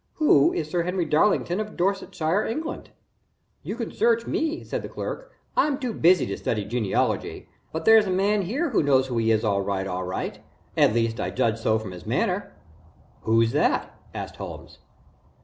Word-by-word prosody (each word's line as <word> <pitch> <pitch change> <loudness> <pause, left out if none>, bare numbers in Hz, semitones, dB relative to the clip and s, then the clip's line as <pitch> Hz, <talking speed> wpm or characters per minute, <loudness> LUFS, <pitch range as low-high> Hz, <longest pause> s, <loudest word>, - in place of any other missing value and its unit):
Who 290 - +5
is 155 - -2
Sir 175 +2 0
Henry 180 0 -1
Darlington 175 +3 +2
of 215 0 -5
Dorsetshire, 190 -1 0
England?" 315 +7 -4 0.7
"You 210 - -5
can 230 -2 -4
search 230 +1 +2
me," 320 +1 -2
said - - -4
the - - -7
clerk. - - -6 0.2
"I'm 300 - +2
too 255 -5 -3
busy 180 -1 +4
to 100 - -4
study 105 -3 -2
genealogy 110 -2 -1 0.2
but 160 - -4
there's 220 -2 +7
a - - -2
man 200 +3 +2
here 265 - -1
who - - +3
knows 135 -3 +3
who 125 -3 -2
he 115 0 +1
is, 110 0 +2
all 100 -3 +1
right, 95 -1 -2
all 95 -1 -3
right 90 +1 -4 0.4
at 105 - +4
least 115 0 0
I - - -1
judge 115 -3 0
so 110 -1 +2
from 110 -3 -6
his 90 -2 -10
manner." - - -1 0.7
"Who's 115 +1 +3
that?" - - +1 0.2
asked - - -7
Holmes. - - -9
165 Hz, 185 wpm, -25 LUFS, -, 0.7 s, there's